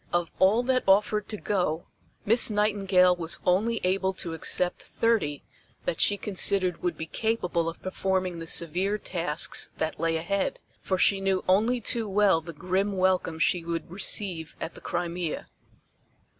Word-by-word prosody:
Of 175 -1 0
all 210 +6 +4
that 255 0 +1
offered 210 +2 +3
to 215 - -4
go 180 -6 -1 0.4
Miss 230 +4 +4
Nightingale 195 -4 +3
was 170 -1 -2
only 215 +6 +2
able 190 +1 +1
to 175 -3 -3
accept 175 +2 -1
thirty 205 -12 0 0.4
that 165 - -2
she 205 - +3
considered 190 -3 +1
would 175 - -2
be 160 - -4
capable 180 -4 -1
of 165 - -11
performing 185 -2 -1
the 165 - -7
severe 180 +6 +2
tasks 170 -6 -1
that 160 0 -3
lay 165 0 +1
ahead, 195 +4 -1 0.2
for 190 - -1
she 195 +1 +3
knew 195 -1 0
only 220 +7 +3
too 230 -1 0
well 195 -4 +3
the 170 +1 -8
grim 185 +5 -1
welcome 185 -3 +1
she 175 +1 +1
would 165 0 -4
receive 185 -3 -1
at 165 - -5
the - - -13
Crimea. 175 -2 -3
185 Hz, 155 wpm, -27 LUFS, 170-205 Hz, 0.4 s, all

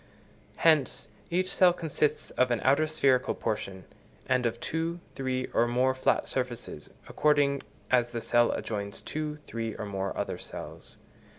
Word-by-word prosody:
Hence, 155 -8 +3 0.2
each 185 +2 +1
cell 180 -2 +6
consists 155 -3 -1
of 125 0 +2
an 120 -2 +1
outer 140 +4 +4
spherical 135 -4 +2
portion, 95 -4 -3 0.4
and 125 -1 +2
of 115 0 -4
two, 165 +4 -2
three, 130 -1 -1
or 120 - +3
more 125 +2 +2
flat 130 - +1
surfaces, 125 -3 -3 0.2
according 145 -2 +2 0.3
as 120 -2 +4
the 120 -1 -3
cell 120 +1 +3
adjoins 100 -2 -3
two, 155 -1 -3
three 115 -1 -4
or 110 - -5
more 100 -1 -3
other - - -2
cells. - - -7
130 Hz, 150 wpm, -29 LUFS, 115-150 Hz, 0.4 s, cell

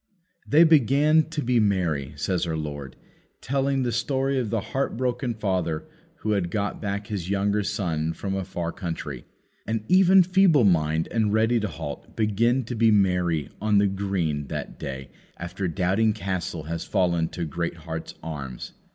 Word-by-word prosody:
"They 155 +4 +6
began 155 +1 +4
to 160 -2 -3
be 120 0 +2
merry," 85 -10 0
says 90 +4 -1
our 80 -1 -2
Lord, 70 -4 -6 0.4
telling 135 +1 0
the 120 - 0
story 135 +3 0
of 120 -4 -2
the 115 +1 0
heart 135 -3 -1
broken 125 -1 -1
father 90 -7 -1 0.4
who 110 - -1
had 95 -4 0
got 100 +2 -2
back 100 -1 -3
his 95 -4 -4
younger 100 +1 +1
son 80 -6 -1
from 95 +2 -4
a 95 0 -1
far 85 -2 -4
country. 85 -2 -5 0.4
And 110 -1 -1
even 190 0 +6
Feeble 180 -6 +4
mind 80 -4 +2
and 110 -3 +1
Ready 110 +2 +3
to 105 - -1
halt 75 -4 -7
begin 115 +4 +2
to 120 - -5
be 115 0 +4
merry 90 -7 +2
on 105 -1 +3
the 100 - +5
green 95 -7 -1
that - - -6
day 65 -1 -6 0.3
after 90 +2 -4
Doubting 95 +6 +1
Castle 90 -5 -3
has 80 +1 -4
fallen 85 -4 +1
to 85 - -4
Greatheart's 80 0 -5
arms. 70 -6 -6
100 Hz, 165 wpm, -25 LUFS, 85-115 Hz, 0.4 s, They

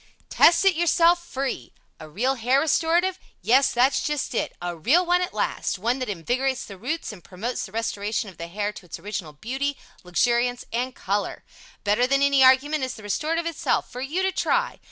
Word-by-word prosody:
Test 340 +3 +5
It 390 - +6
Yourself 345 +1 +3
FREE 265 - -4 0.3
A 155 -1 -10
real 240 - 0
Hair 255 +2 +2
Restorative? 340 +4 +1 0.2
Yes 270 +4 +4
that's 250 +3 +2
just 295 -4 -2
it - - -1
a 175 0 -4
real 290 - +3
one 355 +1 +2
at 360 - -2
last - - -2
one 235 +7 -1
that 255 - -3
invigorates 245 +8 -1
the 200 - -10
roots 255 - -4
and 180 -5 -13
promotes 220 +6 -4
the - - -16
restoration 215 0 -2
of 185 - -12
the 170 - -5
hair 205 +4 -3
to 185 - -13
its - - -7
original 195 -7 -6
beauty, 265 - -3 0.3
luxuriance 240 +7 +1
and 250 +2 -2
color. 200 +1 -2 0.4
Better 215 +5 +2
than 275 +1 +2
any 280 -1 +4
argument 265 +3 +4
is 255 - -3
the 220 - -12
Restorative 315 +11 -1
itself 335 -2 -1
for 250 - -6
you 315 +8 -2
to 380 - +1
try. 485 +5 0
255 Hz, 195 wpm, -24 LUFS, 205-305 Hz, 0.4 s, It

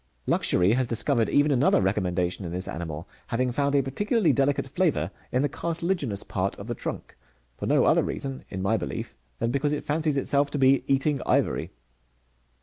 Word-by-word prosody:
Luxury 90 +4 +2
has 130 0 +1
discovered 115 +1 +1
even 145 +1 +3
another 135 +1 +4
recommendation 95 -1 0
in 85 - -5
this 90 +2 -1
animal, 80 0 -5 0.2
having 125 +2 0
found 140 +3 0
a 140 - +4
particularly 205 - +1
delicate 140 0 +1
flavour 165 +5 0 0.2
in 130 +2 +1
the - - +3
cartilaginous 165 - -2
part 95 +1 -2
of 100 - -9
the 120 - -3
trunk, - - -6 0.4
for - - -5
no - - +4
other - - +4
reason, 135 -1 -4
in 95 -1 -4
my 110 +3 +2
belief, - - -5 0.2
than 115 - -1
because 140 +2 0
it 150 - -2
fancies 150 -1 0
itself 140 +1 +2
to 145 - -3
be 135 0 +4
eating 135 +1 +1
ivory. - - +1
135 Hz, 180 wpm, -26 LUFS, 100-145 Hz, 0.4 s, another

